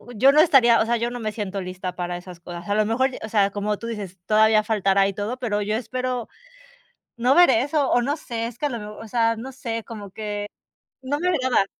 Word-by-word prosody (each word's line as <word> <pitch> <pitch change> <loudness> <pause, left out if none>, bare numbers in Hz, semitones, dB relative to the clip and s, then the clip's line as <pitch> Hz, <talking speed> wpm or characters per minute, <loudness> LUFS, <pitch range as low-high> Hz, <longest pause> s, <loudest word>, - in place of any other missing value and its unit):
yo 265 +6 +6
no 300 +2 +6
estaría 255 -8 +5
o - - +2
sea, 235 +1 +1
yo 235 +1 -1
no 245 - -6
me 215 - -2
siento 200 -2 -4
lista 185 0 -6
para 175 0 -3
esas 175 -1 -11
cosas, 175 0 -9
a 205 - +1
lo 215 0 +3
mejor, 260 +5 +1
o 220 - -5
sea, 200 -2 +2
como 205 +1 -2
tú 230 - -7
dices, 200 -5 -6
todavía 215 0 +4
faltará 195 -2 +2
y 200 - -3
todo, 210 +6 -4
pero 215 -5 -1
yo 210 +1 -1
espero 250 +1 -3 0.9
no 245 +3 +3
ver 350 -4 +7
eso, 275 +4 +1
o 245 - +3
no 285 +5 -1
sé, 230 -7 -4
es 235 0 -8
que 295 - -1
a - - +1
lo 235 - -4
mejor 210 +1 -9
o 220 - -11
sea, 230 0 +1
no 260 +4 -7
sé, 230 -4 -5
como 205 -4 -9
que 205 0 -4 0.6
no 270 +2 -2
me 360 +2 +1
agrada. 260 - +2
225 Hz, 245 wpm, -23 LUFS, 205-250 Hz, 0.9 s, ver